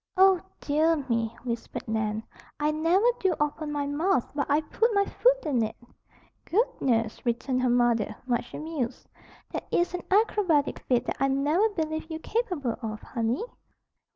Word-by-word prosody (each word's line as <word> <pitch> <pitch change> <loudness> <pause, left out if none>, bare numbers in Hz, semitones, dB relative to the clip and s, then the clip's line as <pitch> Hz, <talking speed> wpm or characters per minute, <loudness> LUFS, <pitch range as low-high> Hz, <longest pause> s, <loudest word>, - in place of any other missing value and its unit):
"Oh, 380 -2 +6 0.2
dear 310 +3 +3
me!" 230 -6 -2
whispered 235 -2 -4
Nan. 220 0 -1 0.4
"I 300 +1 +2
never 330 +7 +2
do 375 -4 +2
open 295 +1 -1
my 290 -1 -1
mouth 285 -1 +1
but 285 0 -2
I 290 +2 +3
put 450 +9 +1
my 400 0 +4
foot - - +2
in 270 -6 +1
it!" 220 - -3 0.7
"Goodness!" 245 - 0
returned 250 +2 0
her 255 - +2
mother, 235 -3 +2
much 240 -1 -1
amused. 305 -6 -4 0.4
"That - - -5
is 350 +1 +1
an 360 - -3
acrobatic 385 -7 +2
feat 250 -1 +2
that - - -3
I 275 - +3
never 295 +10 +2
believed 315 -4 -3
you 320 - -3
capable 355 - -2
of, 215 -2 -4
honey." 235 - -1
290 Hz, 155 wpm, -27 LUFS, 240-345 Hz, 0.7 s, Oh